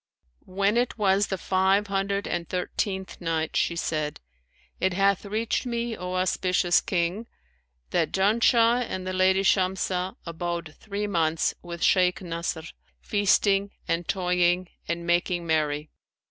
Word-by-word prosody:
When 200 +4 +1
it 245 0 0
was 200 -1 +3
the 190 - -2
Five 190 +3 +2
Hundred 200 0 -1
and 170 -1 -3
Thirteenth 190 +1 -3
Night, 165 -2 -1
She 170 - +1
said, 155 -3 -2 0.6
It 190 -1 +1
hath 195 +2 +2
reached 220 +5 -1
me, 235 -1 -2
O 180 -1 -5
auspicious 185 -1 +2
King, 185 +5 -1 0.6
that, 160 - +1
"Janshah 230 +4 +3
and 185 0 -4
the 185 - -3
lady 190 +1 +3
Shamsah 185 -1 +1
abode 170 -1 -4
three 205 0 -4
months 165 -5 +1
with 170 -1 -6
Shaykh 180 -1 +3
Nasr, 170 -1 -3 0.4
feasting 200 -1 +2 0.2
and 165 +1 -1
toying 180 -1 +1 0.2
and 170 0 -3
making 175 0 +1
merry. 150 -2 0
185 Hz, 130 wpm, -26 LUFS, 170-200 Hz, 0.6 s, was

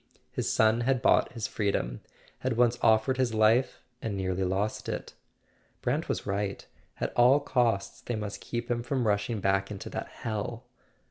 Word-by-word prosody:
His - - -1
son 110 +2 +3
had 130 +1 +2
bought - - +3
his 115 -4 -3
freedom, 95 - -1 0.4
had 115 - -1
once 120 0 +3
offered 110 +4 +4
his 125 -4 +1
life 110 +4 +3 0.2
and 105 -3 -3
nearly 95 0 -1
lost 95 +3 -1
it. - - -4 0.7
Brant - - 0
was - - -2
right: 100 0 -2 0.3
at - - -2
all 125 +4 +6
costs 120 -8 0
they 120 - -3
must 105 -1 -5
keep 120 0 -4
him 120 0 0
from 125 +1 -1
rushing 105 +1 0
back 95 0 +1
into 100 -2 -7
that - - -4
hell. 115 +2 -4
110 Hz, 165 wpm, -29 LUFS, 100-120 Hz, 0.7 s, all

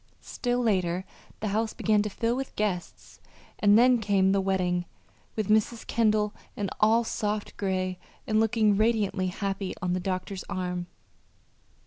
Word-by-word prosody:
Still 245 0 -2
later 185 -4 +1 0.4
the 215 - -1
house 220 +2 0
began 215 -1 +2
to 210 - -2
fill 230 +4 -1
with 265 +1 -5
guests 195 -5 -3 0.4
and 205 0 +6
then 245 +1 +5
came 200 -3 +2
the 195 0 +2
wedding, 180 -2 0 0.5
with 215 -3 -1
Mrs. 220 +2 +1
Kendall 215 -2 +2 0.5
all 220 +2 +5
in - - -6
soft 210 -1 -2
gray 185 -2 -2 0.3
and 215 -1 +2
looking 220 -2 +3
radiantly 210 -4 +1
happy 195 0 -3
on 180 -1 -1
the 185 - 0
doctor's 185 +1 -3
arm. 180 -1 -3
205 Hz, 145 wpm, -27 LUFS, 185-220 Hz, 0.5 s, and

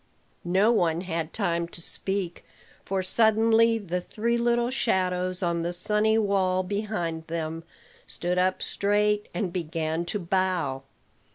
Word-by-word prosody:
No 190 +6 +3
one 170 -7 +2
had 165 -3 -3
time 170 -5 -1
to 170 - -8
speak; 190 +1 -2 0.4
for 190 -1 -2
suddenly 225 +3 +4
the 180 -4 -3
three 230 +6 -1
little 235 +1 +1
shadows 185 -6 0
on 170 -1 0
the 170 +1 -2
sunny 210 +4 +2
wall 190 -3 +1
behind 180 -5 -3
them 165 0 -4 0.4
stood 180 +1 -2
up 185 +1 +1
straight, 210 +1 +1
and 185 -6 -3
began 165 -1 -2
to 190 - -2
bow. 180 -7 -1
185 Hz, 130 wpm, -26 LUFS, 170-210 Hz, 0.4 s, suddenly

